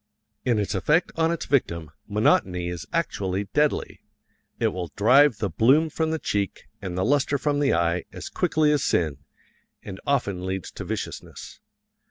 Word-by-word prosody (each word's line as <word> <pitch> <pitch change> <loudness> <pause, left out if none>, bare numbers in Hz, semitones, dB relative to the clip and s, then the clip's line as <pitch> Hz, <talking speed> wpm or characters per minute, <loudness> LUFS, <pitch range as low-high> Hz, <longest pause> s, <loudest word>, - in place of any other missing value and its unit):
In 120 -3 +2
its 105 0 -1
effect 150 - +2
on 165 0 +2
its 170 - -3
victim, 85 - 0 0.2
monotony 95 -4 +2
is 85 -3 -6
actually 95 0 -1
deadly 150 0 +1 0.6
it - - +2
will 90 -2 -4
drive 125 +4 +5
the 105 - -1
bloom 135 - +3
from 160 +1 -1
the 160 - 0
cheek 100 -9 -2 0.2
and 90 -1 -5
the 95 - +1
lustre 140 +1 +2
from 145 +1 0
the 145 - +2
eye 85 +1 0
as - - -7
quickly 155 -1 +1
as 150 -2 +1
sin, 80 -5 +1 0.7
and 95 -2 -8
often 100 -10 0
leads 95 -1 -4
to - - -7
viciousness. - - -6
105 Hz, 165 wpm, -25 LUFS, 90-145 Hz, 0.7 s, drive